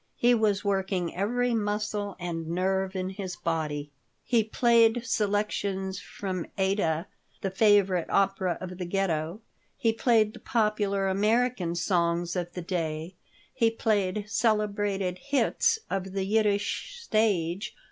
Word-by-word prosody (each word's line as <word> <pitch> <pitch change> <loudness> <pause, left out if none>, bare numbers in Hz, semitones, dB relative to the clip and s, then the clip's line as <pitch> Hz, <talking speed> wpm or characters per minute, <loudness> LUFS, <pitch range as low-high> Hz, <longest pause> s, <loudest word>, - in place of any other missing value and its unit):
He 245 +1 +4
was 210 -3 +1
working 190 -3 -1
every 240 +6 0
muscle 210 -2 -1
and 165 -2 -4
nerve 190 +2 0
in 185 0 -2
his 190 -2 -5
body. 150 -4 -2 0.3
He 235 -3 +2
played 230 +1 +3
selections 200 -3 -1
from 185 -3 -5
"Aïda," 190 -4 +1 0.4
the 195 - -2
favorite 195 -3 +3
opera 195 -2 +1
of 185 0 -7
the 180 - -2
Ghetto; 175 0 -1 0.4
he 230 -5 +2
played 225 -2 +3
the 235 - -11
popular 210 -4 0
American 210 -2 +1
songs 170 -1 0
of 175 -1 -2
the 180 - -5
day; 165 -1 -3 0.4
he 230 -3 +3
played 210 -3 0
celebrated 205 -4 0
"hits" 285 - +2
of 190 -1 -3
the 195 -1 -1
Yiddish 210 - 0
stage. 205 - 0
195 Hz, 125 wpm, -28 LUFS, 180-215 Hz, 0.4 s, He